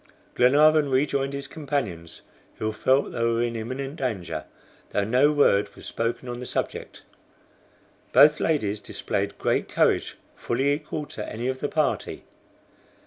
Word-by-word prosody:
Glenarvan 150 +3 +5
rejoined 135 +1 +1
his 140 0 -5
companions, 125 - -4 0.3
who 110 0 -2
felt 130 +5 +1
they 115 - -2
were 115 0 +2
in 120 -1 -2
imminent 130 +6 -5
danger, 110 -10 -3 0.4
though 100 - 0
no 125 +8 +3
word 105 -9 +3
was - - -12
spoken 115 +2 -3
on 120 0 -5
the 125 - -6
subject. - - -4 1.1
Both 150 +1 +6
ladies 110 -10 0
displayed - - -3
great - - 0
courage, - - +1 0.2
fully 135 +4 0
equal 150 0 -4
to 105 - -7
any 120 +3 -3
of 130 0 -3
the 145 - -2
party. 155 -2 -1
130 Hz, 140 wpm, -25 LUFS, 115-145 Hz, 1.1 s, Both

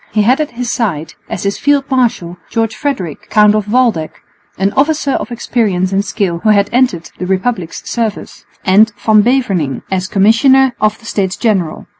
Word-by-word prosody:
He 210 -1 +2
had 255 +7 +3
at 300 - -2
his 245 -1 -2
side, 165 -9 -2 0.2
as - - -4
his 200 0 -2
field 285 -1 +2
marshal, 225 -9 0
George 225 -1 -1
Frederick, 215 - -4
Count 210 -1 +4
of 210 -1 -2
Waldeck, 230 -11 0 0.4
an 195 +2 0
officer 290 0 +1
of 255 - -3
experience 205 -6 -1
and 195 +1 +1
skill 185 -5 -2
who 215 - 0
had 200 -1 +3
entered 245 -10 0
the 180 - -3
Republic's 190 -2 -2
service, 225 -3 -4 0.2
and 210 +4 +4
Van 215 -1 +5
Beverningh 200 - 0
as 185 -1 -1
Commissioner 245 +7 +4
of 215 0 +1
the 225 - -19
States 200 -4 -2
General. 195 -9 -1
215 Hz, 175 wpm, -14 LUFS, 185-245 Hz, 0.4 s, Van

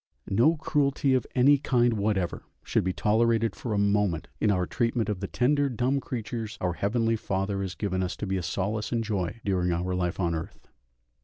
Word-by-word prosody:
No 130 +12 +4
cruelty 140 -3 +1
of 130 - +1
any 140 +3 +5
kind 120 -3 +2
whatever 100 -4 -1 0.2
should - - +1
be 95 - 0
tolerated 115 +2 +2
for 120 - -5
a 105 - +1
moment 100 -4 +1
in 105 - +2
our 90 -3 +2
treatment 115 +1 0
of 105 -3 -2
the 100 - -3
tender 140 +5 +2
dumb 130 +3 0
creatures 115 -3 -5
our 90 -1 -1
Heavenly 115 +4 +1
Father 100 -2 -2
has 95 -2 -4
given 95 -3 -2
us 90 -1 -2
to - - -5
be 95 -1 -1
a - - -2
solace 105 +5 -2
and 115 -1 0
joy 105 -1 -2
during 90 -3 +1
our 90 +2 -1
life 90 0 -1
on 85 -3 +1
earth. 80 0 -7
105 Hz, 200 wpm, -27 LUFS, 95-120 Hz, 0.2 s, any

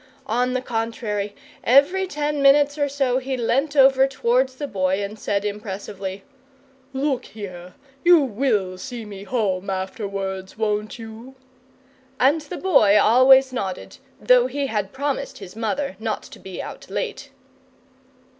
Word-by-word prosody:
On 250 0 0
the 255 0 -1
contrary, 225 -4 -3 0.3
every 310 +10 +4
ten 295 -2 -2
minutes 285 +1 +5
or 285 -2 0
so 270 -2 +1
he 265 0 -3
leant 270 +5 0
over 270 -1 +6
towards 260 0 +1
the 290 - -4
Boy 190 -4 0
and 205 +2 -6
said 205 0 -1
impressively: 200 -2 -5 0.7
"Look 270 -1 -1
here! 180 -4 -9 0.3
you 350 -1 +7
WILL 210 -7 -1
see 240 +1 -7
me 200 -1 -9
home 200 -5 -1
afterwards, 190 -1 -4
won't 210 -1 -1
you?" 225 +3 -10 0.8
And 285 +5 +4
the 300 +4 -7
Boy 215 - +4
always 260 +4 +6
nodded, 195 -7 -5 0.2
though - - +4
he 285 - -2
had 210 -6 -2
promised 280 +1 -3
his 195 -1 -11
mother 225 +3 -2
not 220 -1 -3
to - - -13
be 190 -1 -7
out - - -10
late. 480 -3 -4
235 Hz, 140 wpm, -22 LUFS, 200-275 Hz, 0.8 s, you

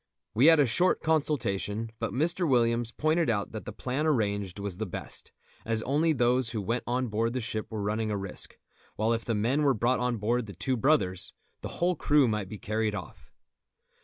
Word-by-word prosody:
We 125 +7 +5
had 165 -1 +8
a 145 - +6
short 175 +10 +2
consultation, 115 -9 0
but 115 - -2
Mr. 170 +5 0
Williams 115 -2 +2
pointed 155 +3 +1
out 105 -3 -1
that 110 - -7
the - - -5
plan 135 +5 -2
arranged 100 - 0
was 100 -3 -4
the 110 0 -3
best, 90 - -6 0.3
as 110 -1 0
only 150 +5 +2
those 125 -3 +2
who 110 -2 -3
went 115 +5 -2
on 125 +2 0
board 115 +2 0
the 130 - -1
ship 110 -2 -3
were 110 -2 -4
running 110 +2 -1
a 105 - -1
risk; 95 -2 -5 0.4
while 110 +2 +1
if 115 0 -2
the 115 - -1
men 120 +8 +1
were 140 -3 +3
brought 120 +4 +1
on 125 -1 0
board 115 +2 0
The 100 - -8
Two 130 +9 -1
Brothers 110 - +1 0.3
the - - -5
whole 180 +1 +2
crew 145 -3 +3
might 105 -4 -2
be 105 - -6
carried 110 +1 -1
off. 90 -5 -9
115 Hz, 205 wpm, -28 LUFS, 105-135 Hz, 0.4 s, had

